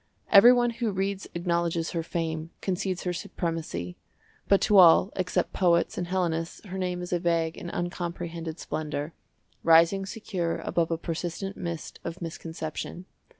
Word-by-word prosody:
Every 225 +4 +10
one 240 -1 +3
who 230 -1 -2
reads 195 0 -2
acknowledges 170 -1 0
her 165 - -1
fame, 160 -1 -3
concedes 185 -1 -2
her 180 - -1
supremacy; 160 - -4 0.5
but 200 - +5
to 210 - +4
all 180 +3 +7
except 185 -1 -1
poets 170 -2 +2
and 175 - -3
Hellenists 170 -3 -2
her 190 -1 -5
name 180 -1 -2
is 180 - -4
a 175 - +2
vague 165 -1 0
and 175 - -7
uncomprehended 170 -2 -4
splendour, 155 0 -4 0.5
rising 170 +4 +5
secure 190 -5 -3
above 170 -1 0
a 165 - 0
persistent 175 +4 -4
mist 170 -2 -6
of 170 +2 -5
misconception. 165 +1 -6
170 Hz, 150 wpm, -27 LUFS, 165-185 Hz, 0.5 s, Every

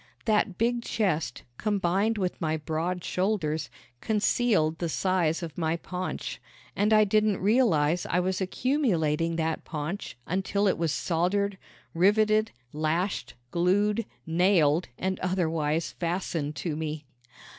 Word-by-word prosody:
That 210 -4 +2
big 235 +1 +1
chest, 190 -9 -1 0.2
combined 205 +1 +1
with 185 -3 -2
my 160 -1 0
broad 165 +4 -2
shoulders, 160 -6 -1 0.3
concealed 210 -6 +2
the 170 - -1
size 175 -1 +1
of 165 -3 -6
my 160 0 0
paunch, 180 +2 -5 0.3
and 210 +2 +2
I 215 0 +7
didn't 215 -1 +2
realize 180 - +2
I 180 - +1
was 185 +1 -1
accumulating 175 - +1
that 160 -1 -1
paunch 155 +1 -5
until 195 +3 0
it 185 - +1
was 165 -2 +1
soldered, 190 +5 0 0.3
riveted, 215 +4 +3 0.2
lashed, 155 -2 -1 0.2
glued, 205 +5 +2 0.2
nailed 165 -2 +3
and 190 0 -2
otherwise 165 -4 0
fastened 165 -4 -2
to 165 -4 -3
me. 155 -1 -4
180 Hz, 125 wpm, -27 LUFS, 160-205 Hz, 0.3 s, I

